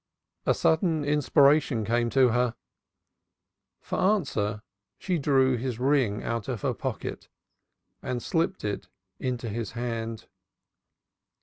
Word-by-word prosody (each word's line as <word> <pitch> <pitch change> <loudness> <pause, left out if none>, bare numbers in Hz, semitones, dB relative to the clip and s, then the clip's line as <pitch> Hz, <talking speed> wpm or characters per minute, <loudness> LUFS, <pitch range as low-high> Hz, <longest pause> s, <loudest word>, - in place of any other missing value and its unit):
A - - +4
sudden 160 -2 +2
inspiration 145 -4 +3
came 120 +2 +1
to 130 0 +4
her. 120 0 +1 1.3
For - - -3
answer 115 - +1 0.3
she 180 -3 -1
drew 135 -3 +3
his 120 -1 -3
ring 125 -5 +1
out 115 -3 -3
of 125 -6 -4
her - - +1
pocket - - -5 0.7
and 125 -1 -3
slipped 165 - -1
it 105 -1 -3 0.3
into 125 -2 -3
his 115 0 -4
hand. 115 -2 -4
125 Hz, 115 wpm, -27 LUFS, 115-145 Hz, 1.3 s, A